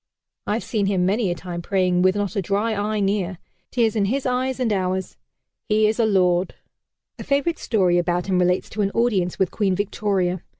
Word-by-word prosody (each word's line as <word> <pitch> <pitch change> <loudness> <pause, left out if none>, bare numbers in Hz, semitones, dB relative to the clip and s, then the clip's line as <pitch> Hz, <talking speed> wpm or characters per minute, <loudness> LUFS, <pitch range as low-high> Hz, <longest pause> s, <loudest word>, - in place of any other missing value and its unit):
I've 215 +3 -1
seen 210 -4 -1
him 190 -2 +1
many 200 +2 +1
a 175 - -1
time 175 0 -6
praying, 180 -1 +1
with 185 +1 +3
not 205 +1 -2
a 200 - +1
dry 205 +5 0
eye 210 +1 -1
near 195 -2 -1 0.3
tears 230 -3 +1
in 205 -2 +2
his 265 +7 -1
eyes 255 +1 -1
and 235 -4 +1
ours. 185 -1 -2 0.5
He 215 0 +3
is 215 +2 +1
a 225 - +3
lord!" 180 -3 +2 0.6
A - - -5
favorite 285 +4 0
story 185 -6 +2
about 175 0 0
him 185 -2 +1
relates 180 0 +1
to 215 - -2
an 200 - +1
audience 205 -7 +1
with 190 -3 +1
Queen 195 -4 0
Victoria. 190 -3 -1
200 Hz, 200 wpm, -22 LUFS, 180-215 Hz, 0.6 s, with